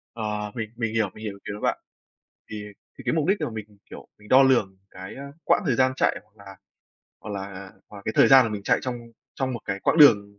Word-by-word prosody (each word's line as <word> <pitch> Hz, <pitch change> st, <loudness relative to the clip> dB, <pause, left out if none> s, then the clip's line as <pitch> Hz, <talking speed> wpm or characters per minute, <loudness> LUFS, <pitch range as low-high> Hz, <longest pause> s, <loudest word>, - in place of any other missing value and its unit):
Ờ, 105 Hz, -2 st, -3 dB
mình 110 Hz, -3 st, -4 dB
mình 115 Hz, -2 st, -3 dB
hiểu, 110 Hz, -3 st, +1 dB
mình 110 Hz, -, -12 dB
hiểu 105 Hz, -2 st, -4 dB
ý 100 Hz, -, -15 dB
kiến 100 Hz, -, -5 dB
của -, -, -15 dB
bạn, -, -, 0 dB, 0.7 s
thì 105 Hz, -1 st, -6 dB, 0.3 s
thì -, -, -11 dB
cái -, -, +2 dB
mục 155 Hz, -1 st, 0 dB
đích 195 Hz, +2 st, +2 dB
để 155 Hz, -, -1 dB
mà -, -, -4 dB
mình, 105 Hz, -2 st, -9 dB
kiểu, -, -, -11 dB
mình 105 Hz, 0 st, -17 dB
đo 130 Hz, +1 st, +7 dB
lường 110 Hz, -8 st, +2 dB
cái, 95 Hz, +1 st, -9 dB
a, 140 Hz, -, -8 dB, 0.2 s
quãng -, -, +3 dB
thời 130 Hz, -6 st, +1 dB
gian 130 Hz, 0 st, +3 dB
chạy, -, -, +1 dB
hoặc 100 Hz, -1 st, -20 dB
là 95 Hz, -1 st, -12 dB, 0.6 s
hoặc 110 Hz, -, -8 dB
là 100 Hz, -1 st, -7 dB, 0.2 s
hoặc 100 Hz, -1 st, -12 dB
cái 110 Hz, -, -1 dB
thời -, -, +6 dB
gian 135 Hz, -1 st, +8 dB
mà -, -, -4 dB
mình 105 Hz, -1 st, -5 dB
chạy -, -, +2 dB
trong 125 Hz, -2 st, -4 dB, 0.4 s
trong 130 Hz, -1 st, -2 dB
một 120 Hz, -, -5 dB
cái 100 Hz, -, -4 dB
quãng 160 Hz, -, +1 dB
đường 100 Hz, -8 st, +6 dB
110 Hz, 260 wpm, -25 LUFS, 100-130 Hz, 0.7 s, gian